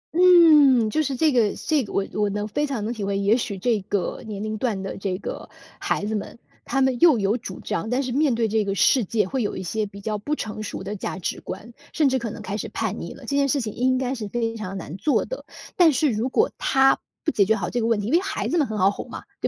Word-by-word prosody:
嗯， 305 -10 +6
就 310 - +1
是 280 -3 -1
这 305 +4 +3
个 230 -5 +2
这 305 -4 0
个 210 - -9
我 195 - 0
我 210 -1 +1
能 205 +1 -3
非 295 +8 -1
常 235 -7 -3
能 235 - -2
体 215 - -5
会， 195 0 -1
也 200 +3 +3
许 230 -5 -3
这 215 +1 0
个 190 -1 -2
年 210 -1 -5
龄 215 0 -3
段 210 -6 -1
的 195 - -5
这 190 -2 -3
个 - - -7 0.3
孩 - - -1
子 220 - -2
们， 215 +2 -4 0.3
他 270 - 0
们 260 -2 +1
又 320 -8 +6
有 200 +1 +1
主 195 -6 -7
张， 195 +7 -3
但 255 +3 0
是 255 - -3
面 280 -1 +2
对 225 -1 +1
这 220 0 +1
个 195 -1 -2
世 250 +5 +4
界， 210 0 0
会 260 +4 -2
有 210 - -2
一 - - -5
些 210 +4 -2
比 200 0 -12
较 215 +1 -3
不 295 +9 -2
成 215 -5 -5
熟 200 - -5
的 200 +2 -4
价 190 - -4
值 180 - -4
观， 205 +6 -8 0.2
甚 305 -3 +3
至 260 0 +1
可 235 -2 -4
能 215 0 -8
开 205 -1 -4
始 - - -5
叛 - - -3
逆 - - -6
了， - - -14
这 280 - -2
件 280 0 +3
事 285 - +2
情 220 -5 -4
应 255 +1 +1
该 255 0 -1
是 225 -5 -5
非 230 +1 -2
常 195 -3 -5
难 165 -3 -7
做 245 +10 +1
的。 - - -6 0.3
但 345 -3 +6
是 280 0 +2
如 225 +4 -1
果 445 - +2
他 270 0 +3 0.2
不 315 - +1
解 200 - +3
决 220 +3 +2
好 190 -4 -3
这 245 - -1
个 225 - 0
问 225 -3 +2
题 205 - -5
因 250 - -1
为 340 - +6
孩 390 - -3
子 345 - +1
们 290 - +2
很 215 - -4
好 195 0 +4
哄 - - -8
嘛， - - -7 0.2
对 - - +1
225 Hz, 305 characters per minute, -23 LUFS, 205-265 Hz, 0.3 s, 嗯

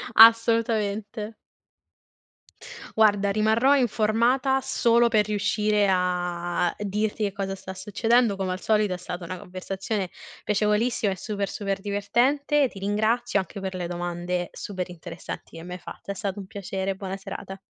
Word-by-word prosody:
Assolutamente. 225 -1 +4 1.7
Guarda, 205 -2 +4
rimarrò 220 +7 +4
informata, 245 +3 +2
solo 235 0 +3
per 215 -3 +3
riuscire 210 0 +1
a 175 -1 0
dirti, 210 +1 -1
che 200 - -1
cosa 195 -1 -3
sta 190 0 -8
succedendo. 220 +3 +2
Come 190 -1 -2
al 185 - -4
solito, 210 -3 +2
è - - -3
stata 180 0 -6
una 185 +2 -5
conversazione 190 +1 -4 0.4
piacevolissima 210 +1 +1
e - - -4
super, 200 -1 -2
super 195 -1 -3
divertente. 255 +8 +2
Ti - - -10
ringrazio 215 +3 +1
anche 190 +1 -4
per 190 -1 -4
le 180 -1 -3
domande 175 0 -3
super 185 -3 -5
interessanti 170 -1 -8
e 165 - -8
me 180 +1 -6
fa - - -10
t - - -35
è 200 - -2
stato 200 0 -4
un 195 - -7
piacere. 195 0 -3
Buona 190 0 -5
serata. 195 0 -7
200 Hz, 145 wpm, -25 LUFS, 190-220 Hz, 1.7 s, Assolutamente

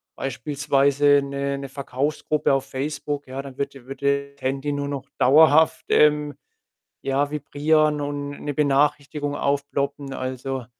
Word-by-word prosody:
beispielsweise 140 +1 +2
'ne 140 0 -3
'ne 140 -1 -7
Verkaufsgruppe 140 +2 -1
auf 135 - 0
Facebook, 145 +1 -4
ja, 130 +1 -5
dann 135 -1 -10
würde 140 -2 -4
würde 140 +1 -1
Handy 135 +2 -2
nur 145 0 -2
noch 140 -1 -4
dauerhaft, 155 +3 +5
ähm, 150 -1 +4 0.7
ja, 135 +1 0
vibrieren 150 +1 +1
und 145 0 -4
'ne 145 - -2
Benachrichtigung 145 0 +1
aufploppen. 140 0 -2
Also, 130 0 -4
140 Hz, 120 wpm, -23 LUFS, 135-145 Hz, 0.7 s, dauerhaft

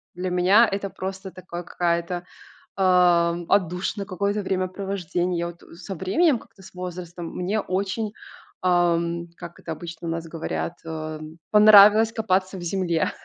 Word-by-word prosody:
Для 180 +1 -3
меня 185 +6 +5
это 195 0 -3
просто 190 0 -6
такой 180 -1 -8
какая-то, 175 0 -2 0.5
а, 180 -3 +4
м, 170 0 -6
отдушина, 190 +1 0
какое-то 200 +2 -1
времяпровождение. 185 -2 -2
Я 170 - -1
вот, 170 0 -12
э, - - -15
со 190 +3 -7
временем, 255 - +2
как-то 195 - -18
с 190 - -14
возрастом, 180 -1 -7
мне 195 +4 -1
очень, 200 +3 -2 0.5
а, 175 -2 +3
м, 170 0 -3
как 170 -1 -10
это 165 - -5
обычно 165 +1 -8
у - - -1
нас 165 0 -4
говорят, 165 +1 -4
а, 155 -1 -5
м, 155 +1 -11
понравилось 210 +1 +8
копаться 195 -4 0
в - - -8
земле. 175 -2 0
180 Hz, 160 wpm, -24 LUFS, 170-195 Hz, 0.5 s, понравилось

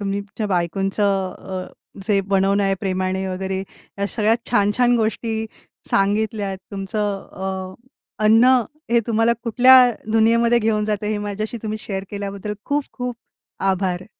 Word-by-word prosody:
तुम्ही 200 0 -2
तुमच्या 205 +2 -5
बायकोंचं 195 +1 0
अ, 185 -1 -6 0.4
जे 205 -3 +3
बनवणं 195 +1 +1
आहे 195 0 +2
प्रेमाने 190 -1 -1
वगैरे 190 0 -3
ह्या 200 +1 -7
सगळ्यात 220 +2 +1
छान-छान 240 +3 +3
गोष्टी 220 0 -1 0.4
सांगितल्यात. 205 0 0
तुमचं 200 0 -3
अ, 190 0 -5 0.5
अन्न 225 +2 +6 0.5
हे 235 0 +4
तुम्हाला 225 0 +3
कुठल्या 250 +1 +7 0.2
दुनियेमध्ये 230 +1 +4
घेऊन 215 -2 +1
जातं 210 -1 -2
हे 210 0 -1
माझ्याशी 215 +3 -4
तुम्ही 215 0 -3
शेअर 195 -2 -4
केल्याबद्दल 200 0 -5
खूप-खूप 270 -4 -3 0.6
आभार. 185 -1 -2
205 Hz, 125 wpm, -21 LUFS, 195-225 Hz, 0.6 s, कुठल्या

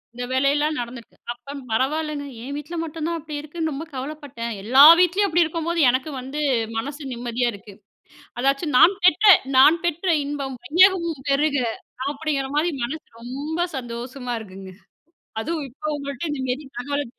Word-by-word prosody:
இந்த 245 - -5
வேலையெல்லா 280 +3 +2
நடந்திருக்கு 240 -1 -7 0.2
அப்போ 245 +4 -12 0.2
பரவாயில்லங்க 295 +4 -1 0.2
என் 280 +2 -5
வீட்டில 295 +4 -6
மட்டும் 320 -1 -5
தான் 335 0 -1
அப்படி 305 -1 -8
இருக்குன்னு 315 +1 -4
ரொம்ப 295 +4 -5
கவலப்பட்டேன். 265 -3 -6
எல்லா 260 +5 +5 0.2
வீட்லயும் 375 +3 +3
அப்படி 345 0 +3
இருக்கும்போது 335 +1 -2
எனக்கு 260 +5 0
வந்து 270 +4 -6 0.4
மனசு 285 +6 -4
நிம்மதியா 240 0 -2
இருக்கு. 200 0 -12 0.7
அதாச்சும் 275 +3 0
நான் 380 +4 +7
பெற்ற 365 +4 +4 0.3
"நான் 305 +6 +7
பெற்ற 345 +3 -2 0.2
இன்பம் 280 -2 -4
வையகமும் 335 -2 +3
பெருக!" 285 +1 +2 0.6
அப்படிங்கிற 280 -2 -2
மாரி 335 +3 +2
மனசு 300 +6 -5 0.2
ரொம்ப 285 +7 -5 0.2
சந்தோசமா 245 +1 -5
இருக்குங்க. 190 -2 -10 0.7
அதுவும் 310 +1 -3
இப்போ 305 +4 -7
உங்கள்ட்ட 280 +2 -5
இந்த 275 -3 -3
மாரி 270 +4 -2 0.2
தகவல். 285 +2 -2
285 Hz, 145 wpm, -23 LUFS, 255-315 Hz, 0.7 s, நான்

